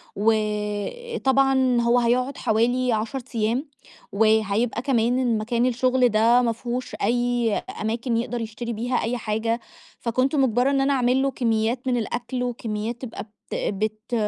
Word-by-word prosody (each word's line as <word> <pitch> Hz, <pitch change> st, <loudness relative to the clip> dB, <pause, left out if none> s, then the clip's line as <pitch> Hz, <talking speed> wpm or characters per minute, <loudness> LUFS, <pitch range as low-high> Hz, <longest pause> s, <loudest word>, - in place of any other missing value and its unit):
وطبعًا 240 Hz, -, +1 dB
هو 235 Hz, +1 st, +3 dB
هيقعد 250 Hz, +3 st, +1 dB
حوالي 245 Hz, +3 st, +1 dB
10 220 Hz, +5 st, -2 dB, 0.2 s
أيام، 230 Hz, +7 st, 0 dB, 0.4 s
وهيبقى 220 Hz, +2 st, +2 dB
كمان 245 Hz, -2 st, +1 dB
مكان 235 Hz, +3 st, 0 dB
الشغل 255 Hz, 0 st, +2 dB
ده 230 Hz, +3 st, +4 dB
ما 235 Hz, -2 st, +1 dB
فيهوش 245 Hz, +2 st, -4 dB
أي 240 Hz, 0 st, +1 dB, 0.3 s
أماكن 230 Hz, +2 st, -1 dB
يقْدر 240 Hz, 0 st, -2 dB
يشتري 230 Hz, +2 st, -5 dB
بيها 245 Hz, +3 st, -2 dB
أي 240 Hz, +2 st, -1 dB
حاجة، 225 Hz, +2 st, -1 dB, 0.4 s
فكنت 255 Hz, +5 st, 0 dB
مُجبرة 255 Hz, -1 st, +3 dB
إن 275 Hz, -1 st, +2 dB
أنا 280 Hz, +1 st, +2 dB
أعمل 255 Hz, 0 st, +2 dB
له 275 Hz, 0 st, +1 dB
كميات 235 Hz, +1 st, 0 dB
من 245 Hz, -1 st, +2 dB
الأكْل 245 Hz, +2 st, -3 dB
وكميات 230 Hz, -1 st, -4 dB
تبقى 235 Hz, -3 st, -6 dB
بت 210 Hz, 0 st, -24 dB, 0.4 s
بت 215 Hz, +3 st, -4 dB
240 Hz, 140 wpm, -24 LUFS, 220-255 Hz, 0.4 s, ده